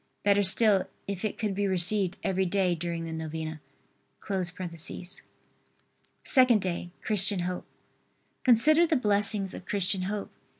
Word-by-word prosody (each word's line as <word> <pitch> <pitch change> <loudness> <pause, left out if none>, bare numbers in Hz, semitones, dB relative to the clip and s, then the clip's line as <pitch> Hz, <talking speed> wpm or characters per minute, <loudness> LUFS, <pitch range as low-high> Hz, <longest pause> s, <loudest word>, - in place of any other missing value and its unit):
Better 205 0 +3
still, 200 0 +3 0.2
if 200 -1 -5
it 215 - -3
could 210 -3 -2
be 200 +1 -1
received 190 +1 +5
every 190 0 -1
day 185 -1 0
during 170 0 -5
the 165 - -6
novena.] 160 -1 -6 2.6
SECOND 255 -5 +4
DAY. 175 -1 -4
CHRISTIAN 200 -2 -1
HOPE. 180 +1 -5 0.8
Consider 305 +8 +4
the 320 - +1
blessings 205 -4 +1
of 185 - -11
Christian 195 -1 -1
hope. 200 +2 -5
195 Hz, 125 wpm, -27 LUFS, 180-210 Hz, 2.6 s, received